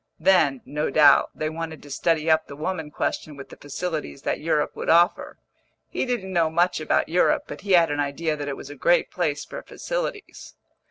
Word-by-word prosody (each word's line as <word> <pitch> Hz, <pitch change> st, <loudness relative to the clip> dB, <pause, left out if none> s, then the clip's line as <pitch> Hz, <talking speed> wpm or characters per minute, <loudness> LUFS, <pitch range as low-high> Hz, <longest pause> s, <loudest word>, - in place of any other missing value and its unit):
Then, 160 Hz, -9 st, +3 dB
no 150 Hz, +1 st, -2 dB
doubt, 145 Hz, 0 st, +5 dB
they 155 Hz, -, -2 dB
wanted 160 Hz, -1 st, -6 dB
to 145 Hz, -, -12 dB
study 160 Hz, +2 st, 0 dB
up 160 Hz, 0 st, +3 dB
the 140 Hz, -, -9 dB
woman 160 Hz, +1 st, -4 dB
question 150 Hz, 0 st, -3 dB
with 140 Hz, -, -10 dB
the -, -, -11 dB
facilities 155 Hz, -1 st, -5 dB
that -, -, -1 dB
Europe 150 Hz, -1 st, 0 dB
would -, -, -4 dB
offer; 170 Hz, +1 st, +3 dB, 0.5 s
he -, -, -2 dB
didn't 200 Hz, -7 st, -3 dB
know 165 Hz, -2 st, +2 dB
much 175 Hz, +2 st, +1 dB
about 155 Hz, -, +1 dB
Europe, 175 Hz, +3 st, +2 dB
but -, -, -9 dB
he 200 Hz, -2 st, 0 dB
had 170 Hz, -3 st, +5 dB
an 145 Hz, -, -2 dB
idea 150 Hz, +3 st, -1 dB
that 145 Hz, -1 st, -6 dB
it 140 Hz, -, -4 dB
was 140 Hz, -, -9 dB
a -, -, -9 dB
great 170 Hz, +6 st, +2 dB
place 155 Hz, -5 st, -2 dB
for -, -, -8 dB
facilities. -, -, -6 dB
160 Hz, 205 wpm, -24 LUFS, 145-175 Hz, 0.5 s, doubt